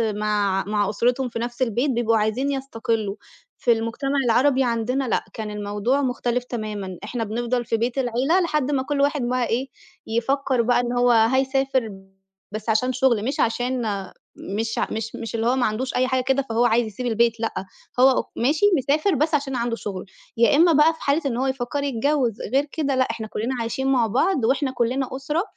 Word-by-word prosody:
مع 205 -2 0
مع 205 -1 0
أسرتهم 245 +4 0
في 230 - -5
نفس 240 +2 -5
البيت 250 +3 +1
بيبقوا 230 -2 +2
عايزين 220 +6 0
يستقلّوا، 225 -6 -2 0.4
في 240 - +2
المجتمع 235 +5 0
العربي 260 +3 +3
عندنا 245 +2 -1
لأ، - - 0
كان 215 -1 -5
الموضوع 210 +6 -1
مختلف 245 -2 -1
تمامًا، 210 -6 -5
إحنا 240 -2 -3
بنفضل 240 +3 -2
في 225 0 0
بيت 240 +3 -2
العيلة 260 +7 +2
لحد 300 -4 0
ما 265 -2 +1
كُلّ 285 0 -1
واحد 285 -1 +1
بقى 245 0 0
إيه 255 +4 -1 0.4
يفكّر 255 +2 0
بقى 245 +1 +2
إن 240 0 -1
هو 245 0 +3
هيسافر 260 +1 +2 0.6
بس 215 +1 -5
عشان 250 +4 +2
شغل، 245 -4 +2
مش 275 +4 -2
عشان 245 +1 0 0.6
مش 220 +3 -3
ع - - 0
مش 220 0 -4
مش 230 0 -5
اللي 225 +1 0
هو 255 - +3
ما 255 - +1
عندوش 235 +5 -2
أي 255 +1 +2
حاجة 260 -1 0
كده 265 +1 +1
فهو 230 +2 +2
عايز 235 -1 +2
يسيب 245 +4 -6
البيت، 230 0 +1
لأ، 225 -4 -3 0.3
هو 265 +1 +7
أو - - +1
ماشي 295 - +2
مسافر 300 +7 +1
بس 305 +3 +1
عشان 275 -2 -2
عنده 235 -1 -1
شغل، 200 -5 -6 0.3
يا 235 +4 +4
إمّا 335 +1 +5
بقى 300 +3 +5
في - - -16
حالة 285 +4 +1
إن 245 -4 -1
هو 265 +1 0
يفكّر 265 +2 -2
يتجوّز، 265 -3 0
غير 275 +2 +3
كده 285 -4 -1
لأ، 260 - +3
إحنا 220 -1 -6
كُلّنا 230 +5 -3
عايشين 250 +4 -2
مع 250 -4 +3
بعض 265 - +1
وإحنا 265 +2 +1
كُلّنا 255 +2 -1
أسرة، 295 +6 -1
245 Hz, 195 wpm, -23 LUFS, 225-270 Hz, 0.6 s, هو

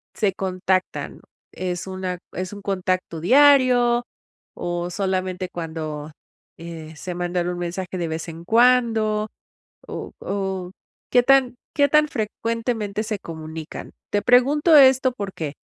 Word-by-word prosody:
se 200 -3 +1
contactan? 185 0 -2 0.3
¿Es 180 0 -3
una 185 -1 -4 0.2
es 185 +2 -4
un 205 - -9
contacto 185 -4 -2
diario 250 - +5 0.6
o 175 0 -2
solamente 185 -1 -2
cuando, 155 -3 -5 0.5
eh, 160 -2 -9
se 180 +2 -5
mandan 175 0 -1
un 175 0 -4
mensaje 180 +1 -4
de 170 - -1
vez 160 +1 -4
en 165 +1 -9
cuando? 225 -2 +3 0.6
O - - -6
o, 190 -2 -3 0.4
¿qué 245 - +6
tan 265 -2 +4 0.2
qué 285 -1 +4
tan 300 +1 +4
frecuentemente 225 -1 -2
se 210 -2 -3
comunican? 160 -1 -8 0.2
Te 205 - +1
pregunto 280 - +4
esto, 265 -1 +6
¿por 200 -5 -5
qué? 150 -3 -4
190 Hz, 130 wpm, -23 LUFS, 175-240 Hz, 0.6 s, qué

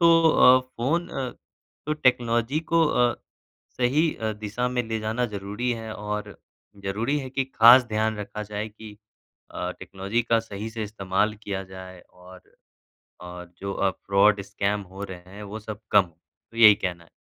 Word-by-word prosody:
तो 165 -1 +6
अ, 130 -2 +7
फ़ोन 130 +7 -2
अ, 130 -2 -4 0.6
तो 150 - 0
टेक्नोलॉजी 125 0 +1
को 165 -1 +5
अ, 125 -4 +2 0.6
सही 145 +6 +2
अ, 110 -1 -3
दिशा 110 +4 -2
में 125 -1 -1
ले 110 0 -1
जाना 110 +3 -1
ज़रूरी 105 +4 -4
है। 110 -1 -6
और 105 0 -5 0.5
ज़रूरी 115 +9 -1
है 130 -2 -6
कि 135 0 -1
खास 120 +3 +8
ध्यान 110 0 0
रखा 105 +1 -6
जाए 105 +1 -5
कि 105 0 -12 0.5
अ, - - -4
टेक्नोलॉजी 100 +5 -2
का 115 -1 +2
सही 110 0 -7
से 110 -1 -5
इस्तेमाल 100 0 -1
किया 95 -1 -3
जाए। 95 -1 -10
और 90 0 -16 0.7
और 90 0 -9
जो 100 0 -4
अ, 95 -1 +1
फ्रॉड 100 +2 +2
स्कैम 100 +1 -2
हो 100 +1 -5
रहे 90 -1 -10
हैं, 105 - -8
वो 105 +2 -7
सब 105 0 -8
कम 100 -1 +7
हो। 85 -2 -21 0.3
तो 115 - -15
यही 105 -3 +9
कहना 90 -3 -4
है। - - -25
110 Hz, 175 wpm, -25 LUFS, 100-125 Hz, 0.7 s, यही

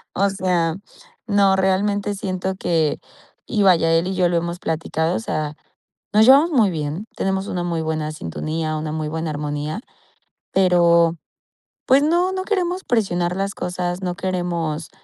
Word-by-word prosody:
o 200 +2 +2
sea, 180 -4 0 0.5
no, 200 -2 +4
realmente 200 +2 +1
siento 190 -1 -3
que, 160 -3 +1 0.5
y 210 -4 +1
vaya, 170 -4 +4
él 165 +2 +2
y 190 - -2
yo 180 -1 +3
lo 170 - +1
hemos 170 +1 -3
platicado, 160 +1 -1
o - - -1
sea, 155 -8 -3 0.6
nos 215 +1 +6
llevamos 280 +6 +7
muy 225 -8 +4
bien, 155 +4 -4
tenemos 190 0 -1
una 175 -1 -2
muy 170 -2 -1
buena 155 -1 -2
sintonía, 155 - -3
una 155 0 -4
muy 155 -1 -3
buena 160 +1 -3
armonía, 150 +4 -3 0.7
pero, 170 -3 +4 0.7
pues 270 +2 +5
no, 345 +4 +2
no 375 0 -2
queremos 370 -3 -1
presionar 180 -7 0
las 195 +1 -2
cosas, 180 0 -3
no 180 -2 -2
queremos 175 -4 -2
180 Hz, 155 wpm, -21 LUFS, 160-200 Hz, 0.7 s, llevamos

